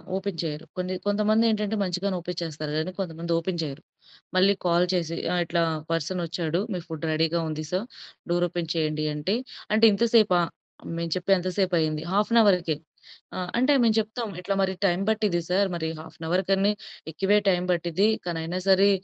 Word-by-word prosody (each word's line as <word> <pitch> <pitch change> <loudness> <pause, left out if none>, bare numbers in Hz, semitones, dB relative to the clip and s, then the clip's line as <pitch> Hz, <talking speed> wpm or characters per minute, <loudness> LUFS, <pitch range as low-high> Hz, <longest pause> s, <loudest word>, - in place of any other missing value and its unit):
Open 190 -2 -3
చేయరు. 155 -1 -4
కొన్ని 185 0 -2
కొంతమంది 210 +2 +3
ఏంటంటే 215 0 0
మంచిగానే 185 +1 -1
ఓపెన్ 175 0 -6
చేస్తారు. 155 -2 -4
కానీ 160 +4 -1
కొంతమంది 170 -2 -4
ఓపెన్ 170 +1 -3
చేయరు. 145 0 -6 0.5
మళ్ళీ 190 +2 +5
కాల్ 175 0 +4
చేసి 165 -2 -1 0.2
ఆహ్, 175 - +2
ఇట్లా 170 +1 +1 0.3
పర్సన్ 165 +3 -1
ఒచ్చాడు. 165 0 -2
మీ 180 - -2
ఫుడ్ 160 -1 -5
రెడీగా 160 +2 +1
ఉంది 155 0 -4
సర్, 185 +4 -1 0.5
డోర్ 175 0 +2
ఓపెన్ 175 -1 -4
చేయండి 155 -1 0
అంటే, 150 +8 -1 0.4
అంటే 220 +1 +6
ఇంత 235 +4 +2
సేపా? 185 -6 +5 0.6
మేం 170 0 -2
చెప్పి 185 +2 -1
ఎంత 185 +1 -2
సేపయింది? 160 -5 +1
Half 205 +1 +2
an 235 - +7
అవర్‌కె. 175 -6 +3 0.6
ఆహ్, 180 -1 -3
అంటే 260 +4 +4
మేము 225 -2 +3
చెప్తాం. 220 +1 -3
ఇట్లా 195 +2 -1
మరి 190 0 +1
టైం 175 +1 +1
పట్టిద్ది 210 -5 +1
సర్. 195 +2 +2
మరి 160 -1 -2
హాఫ్ 160 - -13
అన్ 160 - -5
అవర్ 185 +3 +2
కని 195 +1 +3 0.4
ఎక్కువే 200 +5 +3
టైమ్ 180 0 +1
పట్టిద్ది. 175 +4 +1 0.2
కానీ 170 -2 -2
అయినా 175 +3 -3
సరే 195 +1 +6
180 Hz, 185 wpm, -26 LUFS, 165-195 Hz, 0.6 s, అన్